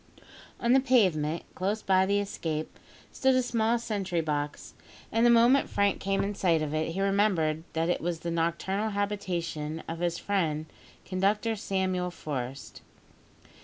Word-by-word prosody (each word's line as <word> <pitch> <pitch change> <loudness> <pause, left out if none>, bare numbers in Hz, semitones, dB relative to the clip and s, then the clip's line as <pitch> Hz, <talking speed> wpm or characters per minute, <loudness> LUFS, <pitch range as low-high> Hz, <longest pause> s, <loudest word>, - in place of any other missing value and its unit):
On 235 +1 +3
the 265 - +7
pavement, 185 - +2
close 205 +4 -2
by 190 0 +3
the 200 +1 +2
escape, 160 -6 -4 0.3
stood 265 0 +2
a 255 - +3
small 230 -1 +1
sentry 200 -6 -2
box, 150 -2 -3 0.4
and 225 - +2
the 240 - +6
moment 240 +4 +5
Frank 200 0 +1
came 195 0 0
in 200 +1 -2
sight 170 -5 +2
of 150 0 -3
it 155 +1 -1
he 195 - -2
remembered 190 -6 +1
that 165 +1 0
it 175 - 0
was 170 -1 -2
the 170 - -3
nocturnal 170 +6 -1
habitation 175 -7 -3
of 165 0 -5
his 170 -1 0
friend 160 -7 -1 0.4
Conductor 205 +4 0
Samuel 190 -3 -1
Forest. 135 -5 -6
185 Hz, 155 wpm, -28 LUFS, 165-210 Hz, 0.4 s, the